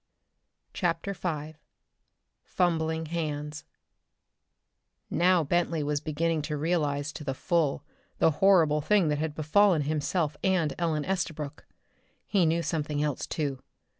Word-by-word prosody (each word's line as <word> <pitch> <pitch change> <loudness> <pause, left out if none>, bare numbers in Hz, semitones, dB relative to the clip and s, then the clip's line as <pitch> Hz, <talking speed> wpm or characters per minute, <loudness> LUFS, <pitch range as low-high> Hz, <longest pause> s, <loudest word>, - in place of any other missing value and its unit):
CHAPTER 175 +2 -1
V 155 -4 -4 0.9
Fumbling 160 -2 0
Hands 150 -2 -4 1.5
Now 180 0 +3
Bentley 165 0 0
was 145 0 -1
beginning 155 +1 0
to 150 0 -3
realize 150 -2 0
to - - -7
the 135 -2 -3
full 155 -3 0 0.3
the 160 - +4
horrible 165 -6 +5
thing 190 0 +3
that 150 -1 0
had 155 -1 -2
befallen 160 +2 +3
himself 150 +1 -1
and 185 -6 +2
Ellen 160 -3 0
Estabrook. 165 -6 -3 0.6
He 185 -5 +2
knew 165 +1 +1
something 150 -3 -1
else, 150 -3 -2
too. 140 -4 -3
155 Hz, 120 wpm, -28 LUFS, 150-170 Hz, 1.5 s, horrible